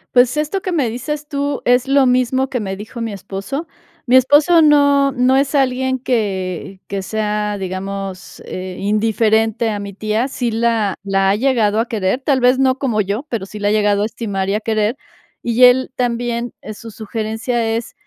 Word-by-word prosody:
Pues, 250 +3 +4
esto 305 +6 -1
que 370 - -3
me 290 -9 +1
dices 295 +6 -5
tú, 285 -1 -2
es 245 +2 +3
lo 275 -1 +4
mismo 255 +1 +2
que 250 -3 -2
me 195 -2 -4
dijo 220 +4 -8
mi 225 -1 -3
esposo. 200 - -5 0.4
Mi 250 0 +3
esposo 290 +6 +5
no 285 -2 +4
no 250 +1 +2
es 275 +1 +1
alguien 260 -1 +1
que 195 -6 -2
que 195 -1 -3
sea, 210 0 -2
digamos, 190 0 -6
eh, 185 0 -6
indiferente 220 +2 +1
a 205 - -3
mi 200 0 -6
tía, 215 +5 -1
sí 245 -3 -2
la 225 -3 +1
la 195 -1 +2
ha - - +2
llegado 225 -3 +2
a 235 - -4
querer, 215 +1 -1
tal 265 0 +1
vez, 250 +1 +3
no 265 0 +2
como 235 -7 +1
yo, 205 +6 -2
pero 230 -8 -3
sí 210 +2 -9
la 205 - 0
ha - - +2
llegado 205 -1 +2
a - - +1
estimar 205 -4 -3
y 195 - 0
a 210 - -1
querer, 215 +1 0 0.5
y 240 +1 +5
él 255 +1 +4
también, 240 -1 -2
eh, 215 - -7
su 225 +1 -10
sugerencia 225 +2 -2
es, 230 0 -5
230 Hz, 195 wpm, -18 LUFS, 205-260 Hz, 0.5 s, esposo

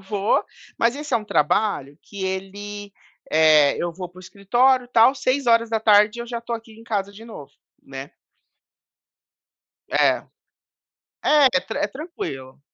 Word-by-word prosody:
vou, 195 +1 0 0.4
mas 235 +4 +2
esse 295 0 -3
é - - +6
um 215 - -5
trabalho 150 -4 0
que 200 -2 -7
ele, 200 +2 -6 0.4
eh, 155 -2 +5
eu 175 -1 -2
vou 180 0 -7
para 180 - -18
o - - -10
escritório, 245 +7 +1
tal, 240 +2 +5
18h 230 -5 +2
eu 235 - -6
já 235 0 -4
estou 235 0 -5
aqui 225 0 -15
em 225 +1 -15
casa 200 -3 -3
de 220 +3 -13
novo, 180 -12 -11 0.3
né. 135 +1 -9 1.8
É. - - +2 1.0
É, 295 -2 +5
é 265 - +2
tran 285 - -6
é 300 - +1
tranquilo. 140 - -8
210 Hz, 145 wpm, -22 LUFS, 190-235 Hz, 1.8 s, é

